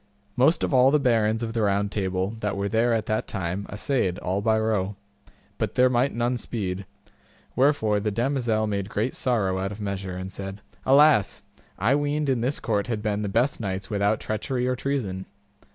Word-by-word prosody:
Most 150 +6 +3
of - - 0
all 130 0 +6
the 150 +2 +3
barons 115 -4 +2
of 115 -1 -3
the 115 - 0
Round 100 0 +1
Table 95 -1 -1
that 100 -1 -1
were 100 0 -1
there 115 +3 +2
at 115 -2 +1
that 110 - -1
time 95 0 -3
assayed 105 -3 -1
all 95 +2 -2
by 110 +1 +2
row, 105 -3 0 0.6
but - - -2
there 125 0 +4
might 130 +3 +2
none 120 +2 0
speed; 100 -5 -4 0.7
wherefore 125 -6 +3
the 105 +1 -1
damosel 115 -1 0
made 100 -2 -2
great 110 +3 -1
sorrow 100 -7 0
out 95 +1 -2
of 105 - -8
measure, 100 -3 -4
and 95 +1 -6
said, 95 +1 -6 0.3
Alas! 140 -6 +5 0.3
I 125 - +2
weened 145 0 0
in 130 -3 +1
this 130 +5 -1
court 105 -3 -1
had 110 -3 -3
been 105 -1 -1
the 105 - -2
best 120 +7 +1
knights 95 -2 -4
without 100 +1 +1
treachery 125 +4 -2
or 130 - +1
treason. 115 -9 -3
110 Hz, 190 wpm, -25 LUFS, 100-125 Hz, 0.7 s, all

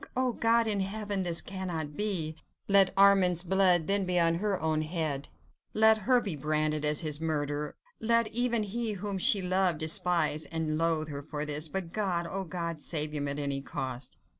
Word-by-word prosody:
Oh, 255 -1 +1
God 230 0 +2
in 210 -2 0
heaven! 200 0 -2
this 175 -2 +2
cannot 170 -6 -5
be! 175 -7 -2 0.3
let 195 -1 +5
Armand's 190 -3 +5
blood 185 -2 +3
then 200 +2 +1
be 180 -1 -1
upon 165 -1 +3
her 205 -2 -1
own 155 -1 0
head! 155 -3 -3 0.5
let 220 0 +6
her 245 +5 +3
be 200 -8 -4
branded 155 +1 -1
as 150 0 +1
his 155 -2 -2
murderer! 150 -2 -2 0.2
let 230 0 +2
even 235 -1 +1
he, 220 +2 -3
whom 200 0 -4
she 195 +1 +3
loved, 185 -2 +2
despise 160 -1 +1
and 160 0 -2
loathe 165 -2 0
her 140 -1 -5
for 150 0 -5
this, 150 +1 -1
but 175 +1 -5
God! 185 -5 -1
oh 195 +2 -4
God! 170 -2 -4
save 150 -1 -1
him 145 -1 -2
at 140 0 -3
any 140 -1 -2
cost! 130 -2 -5
170 Hz, 185 wpm, -29 LUFS, 155-200 Hz, 0.5 s, let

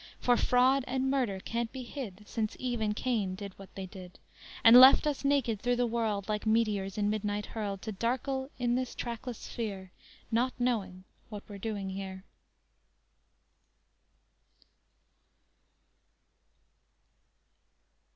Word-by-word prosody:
For 245 - +3
fraud 255 +3 +3
and 265 +1 0
murder 245 -9 0
can't 230 +3 -3
be 260 -1 -6
hid 210 -6 -8
Since 215 -2 -3
Eve 245 -3 -2
and 210 -1 0
Cain 215 -7 -1
did 200 0 -7
what 195 - -13
they 195 - -5
did 185 -1 -11 0.5
And 230 +1 +9
left 265 +3 +8
us 295 -2 -1
naked 270 -7 +1
through 245 0 +1
the 245 0 +1
world, 220 -4 -1
Like 215 0 -2
meteors 210 -3 +1
in 205 -1 +1
midnight 210 -1 -1
hurled, 200 -3 -5
To 220 - -4
darkle 265 +5 -2
in 240 -1 0
this 255 0 -2
trackless 235 0 -5
sphere, 195 -5 -6 0.4
Not 245 +3 +1
knowing 205 -7 -1 0.3
what 210 -2 -8
we're 205 -1 -9
doing 200 -2 -3
here! 190 -1 -6
225 Hz, 130 wpm, -30 LUFS, 200-245 Hz, 0.5 s, And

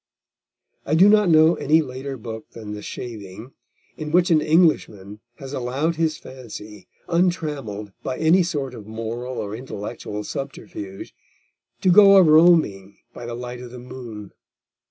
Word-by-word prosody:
I 150 - 0
do 185 +5 +7
not 210 -2 +5
know 160 +1 +6
any 155 +1 +2
later 135 0 -6
book 110 -1 -8
than 105 -2 -8
The 105 - -7
Shaving 110 0 -8 0.5
in 155 -1 -5
which 175 +1 +3
an 155 -2 +5
Englishman 110 - +1 0.2
has 135 +2 -9
allowed 140 +6 -2
his 160 -2 0
fancy, 110 -5 -11 0.2
untrammelled 150 - -1
by 130 - -4
any 160 +4 +4
sort 145 -7 -3
of 110 -4 -10
moral 115 +3 -5
or 105 +1 -4
intellectual 105 -3 -6
subterfuge, 105 -8 -7 0.7
to 185 - +4
go 200 +1 +8
a 190 - +8
roaming 155 - +4 0.2
by 120 - -8
the 120 - -5
light 125 0 -7
of 125 - -9
the 125 - -10
moon. 120 -5 -9
130 Hz, 150 wpm, -22 LUFS, 110-160 Hz, 0.7 s, go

